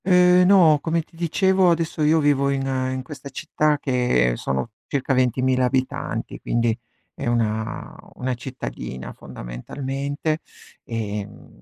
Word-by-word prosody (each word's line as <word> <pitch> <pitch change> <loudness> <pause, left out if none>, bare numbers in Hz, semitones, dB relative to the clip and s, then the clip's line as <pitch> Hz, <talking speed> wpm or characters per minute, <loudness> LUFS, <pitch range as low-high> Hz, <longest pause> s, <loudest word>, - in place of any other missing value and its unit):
Ehm, 180 -1 +6
no, 170 -6 +6
come 165 0 0
ti 165 - -24
dicevo, 185 +2 +3
adesso 165 -1 0
io 155 +2 +4
vivo 140 -2 +3
in 135 -1 0 0.3
in 130 0 -3
questa 140 0 -9
città 150 +2 0
che 125 - +2
sono 65 +4 -2 0.2
circa 140 -1 0
20000 130 0 +2
abitanti, 130 +1 -2
quindi 115 -1 +1 0.4
è 135 - -5
una 110 -1 -1 0.2
una 130 0 -2
cittadina 125 - -6
fondamentalmente, 140 - -4 0.5
ehm, 105 - -6
135 Hz, 125 wpm, -23 LUFS, 120-155 Hz, 0.5 s, Ehm